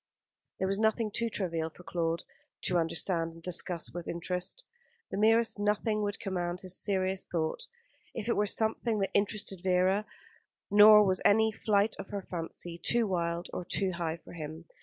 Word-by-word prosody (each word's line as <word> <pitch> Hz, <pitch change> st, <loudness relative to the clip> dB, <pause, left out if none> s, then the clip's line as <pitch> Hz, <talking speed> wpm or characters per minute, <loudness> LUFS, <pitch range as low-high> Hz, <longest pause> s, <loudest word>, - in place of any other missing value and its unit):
There 190 Hz, -, 0 dB
was 195 Hz, +1 st, -1 dB
nothing 220 Hz, 0 st, +1 dB
too 235 Hz, +2 st, -1 dB
trivial 165 Hz, -6 st, -2 dB
for 180 Hz, -, -16 dB
Claude 165 Hz, -1 st, -2 dB, 0.4 s
to 180 Hz, -1 st, +2 dB
understand 165 Hz, 0 st, 0 dB
and 165 Hz, 0 st, -15 dB
discuss 175 Hz, -1 st, 0 dB
with 175 Hz, -1 st, -6 dB
interest. 180 Hz, -, -3 dB, 0.5 s
The -, -, -3 dB
merest 225 Hz, 0 st, +3 dB
nothing 210 Hz, +1 st, +1 dB
would 205 Hz, -1 st, -2 dB
command 180 Hz, -4 st, -3 dB
his 185 Hz, -1 st, -2 dB
serious 190 Hz, -1 st, 0 dB
thought, 170 Hz, -, -2 dB, 0.5 s
if 225 Hz, -1 st, -4 dB
it 235 Hz, -, +2 dB
were 210 Hz, 0 st, +1 dB
something 220 Hz, +1 st, 0 dB
that 195 Hz, -1 st, -1 dB
interested 200 Hz, -2 st, 0 dB
Vera; 190 Hz, +3 st, +2 dB, 0.6 s
nor 210 Hz, +1 st, +9 dB
was 185 Hz, -1 st, +1 dB
any 220 Hz, +2 st, +4 dB
flight 210 Hz, 0 st, +1 dB
of -, -, -6 dB
her 200 Hz, -1 st, -4 dB
fancy 170 Hz, 0 st, -6 dB
too 235 Hz, +4 st, +2 dB
wild 170 Hz, -3 st, -1 dB
or -, -, -3 dB
too 190 Hz, +2 st, 0 dB
high 170 Hz, -2 st, -3 dB
for -, -, -14 dB
him. 160 Hz, 0 st, -7 dB
190 Hz, 170 wpm, -30 LUFS, 170-210 Hz, 0.6 s, nor